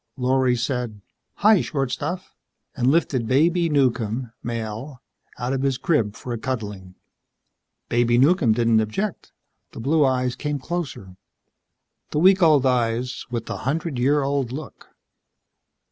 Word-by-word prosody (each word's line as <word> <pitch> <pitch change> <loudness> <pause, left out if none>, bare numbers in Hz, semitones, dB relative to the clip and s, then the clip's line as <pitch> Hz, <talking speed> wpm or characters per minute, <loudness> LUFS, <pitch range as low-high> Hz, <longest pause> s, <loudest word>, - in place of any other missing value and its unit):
Lorry 130 0 +2
said. 120 -3 -3 0.5
"Hi, 215 -3 +7
short 135 -4 -2
stuff," 175 +8 -4 0.4
and 125 -2 0
lifted 135 -6 +1
Baby 165 +6 +3
Newcomb 125 -4 0
Male, 115 +3 -5 0.4
out 125 +2 -2
of 135 - -1
his 135 -2 0
crib 115 -11 0
for 125 - -6
a 115 - -4
cuddling. 105 -8 -5 0.9
Baby 120 0 +2
Newcomb 140 -3 +4
didn't 115 -1 +3
object. 165 - -3 0.4
The - - -8
blue 150 +6 +2
eyes 125 -2 +1
came 150 -1 -3
closer. 135 - -5 0.9
The - - -3
week 190 +4 +5
old 150 -5 +5
eyes 125 0 0
with 120 -2 -3
the - - -5
hundred 150 -1 -2
year 140 +3 +2
old 135 -3 -1
look. 145 +2 -8
130 Hz, 135 wpm, -23 LUFS, 120-150 Hz, 0.9 s, Hi